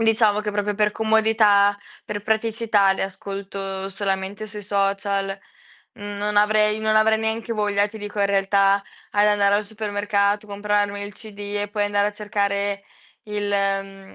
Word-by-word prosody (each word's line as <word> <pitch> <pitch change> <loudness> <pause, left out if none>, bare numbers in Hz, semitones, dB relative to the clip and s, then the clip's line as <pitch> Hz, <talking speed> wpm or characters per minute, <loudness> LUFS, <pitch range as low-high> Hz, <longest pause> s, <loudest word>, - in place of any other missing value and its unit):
diciamo 220 -2 +3
che 210 - -3
proprio 205 0 -1
per 210 0 +1
comodità, 220 -2 +3 0.3
per 205 -1 -4
praticità 220 -2 +2
li - - -3
ascolto 195 0 -5
solamente 195 +1 -3
sui 210 0 -9
social. 195 0 -1 0.6
Mhmm, 205 0 -7
non 210 0 -2
avrei 210 0 +3
non 220 0 +1
avrei 220 0 +4
neanche 220 +1 -2
voglia, 205 -2 +1
ti 220 +1 -10
dico, 205 0 -5
in 200 - +4
realtà, 195 0 +3 0.3
ad 205 0 +3
andare 205 -1 +3
al 210 - -1
supermercato, 205 -1 -1
comprarmi 205 0 -1
il 205 0 -7
CD 210 -2 -12 0.2
e 205 - -4
poi 205 -1 0
andare 205 0 +1
a - - -7
cercare 200 -1 -1 0.4
il 210 -1 -3
mhmm, 195 -1 -2
205 Hz, 155 wpm, -23 LUFS, 200-210 Hz, 0.6 s, avrei